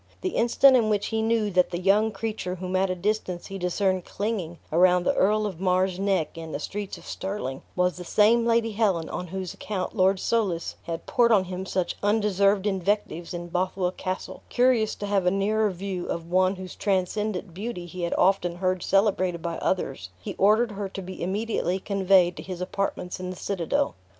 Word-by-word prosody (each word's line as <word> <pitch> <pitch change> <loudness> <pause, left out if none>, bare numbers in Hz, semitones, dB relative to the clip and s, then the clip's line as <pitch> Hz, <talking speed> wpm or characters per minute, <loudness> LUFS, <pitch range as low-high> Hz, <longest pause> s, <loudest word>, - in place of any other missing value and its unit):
The 375 - 0
instant 260 -1 +5
in 225 -3 +3
which 205 -1 +1
he 220 0 0
knew 220 -2 +1
that 180 -1 +3
the 175 - -3
young 205 +4 +3
creature 210 -3 -4
whom 185 +1 -4
at 190 +1 +2
a 185 - -1
distance 185 -2 -2
he 195 -1 -6
discerned 185 +1 0
clinging 195 -6 -3
around 180 +2 +4
the 280 - +2
Earl 215 -1 +2
of 190 -5 -4
Mar's 185 0 +1
neck 195 -6 0
in 160 -1 -7
the 145 - -2
streets 200 +5 -5
of - - -15
Stirling, 190 -9 -4
was 180 0 +1
the 180 - -6
same 220 +6 +4
Lady 230 -1 +2
Helen 195 -7 +1
on 180 - -4
whose 185 0 -5
account 195 -1 -4
Lord 190 -1 +3
Soulis 195 -8 0
had 165 -1 -5
poured 235 -1 +3
on 205 -4 +5
him 185 +1 -5
such 185 -2 -1
undeserved 205 -1 +2
invectives 190 -3 -1
in 175 -1 -5
Bothwell 180 +1 0
Castle; 185 0 -5
curious 245 -3 +2
to 205 - -5
have 200 -3 +1
a - - +7
nearer 210 +3 +1
view 185 -1 -4
of 170 0 -4
one 185 +1 +3
whose 185 -1 -8
transcendent 195 -1 -1
beauty 195 -1 -5
he 175 +1 -8
had 170 - -1
often 180 -2 +2
heard 185 0 0
celebrated 185 -4 +1
by 170 -1 -3
others, 135 - -2
he 90 - -6
ordered 215 +4 +4
her 200 -1 -4
to 195 - -6
be 185 +1 -8
immediately 190 -1 -1
conveyed 190 -3 +3
to - - -5
his 185 -2 -6
apartments 180 0 -3
in 180 0 -4
the 185 - -5
citadel. 175 - -1
190 Hz, 195 wpm, -26 LUFS, 180-210 Hz, -, a